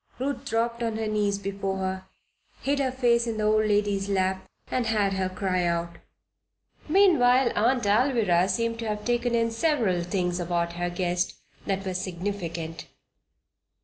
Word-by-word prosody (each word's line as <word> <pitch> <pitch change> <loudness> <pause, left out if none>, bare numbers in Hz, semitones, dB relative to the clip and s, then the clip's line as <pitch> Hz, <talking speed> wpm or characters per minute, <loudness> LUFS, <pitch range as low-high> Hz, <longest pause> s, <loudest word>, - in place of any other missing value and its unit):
Ruth 275 +2 -3
dropped 235 +1 -1
on 225 -2 -1
her 220 - -2
knees 210 -2 0
before 195 -1 -3
her, 190 0 -3 0.6
hid 280 +1 +1
her 265 -2 +1
face 240 -2 +2
in 225 -1 -2
the 215 - -1
old 215 0 +3
lady's 205 -1 +1
lap, 190 -1 0 0.2
and 250 -3 0
had 210 -3 +1
her 190 -1 -1
cry 185 -1 -1
out. 170 0 -1 0.9
Meanwhile 270 -9 +5
Aunt 240 +4 +2
Alvirah 205 -5 +3
seemed 230 +3 -1
to 230 - -3
have 210 0 -3
taken 240 0 +1
in 230 0 +1
several 230 - +1
things 180 0 -1
about 170 -1 -1
her 175 0 -2
guest 175 0 -1 0.3
that 195 -1 -1
were 190 - -2
significant. 175 -3 -4
205 Hz, 155 wpm, -26 LUFS, 185-235 Hz, 0.9 s, Meanwhile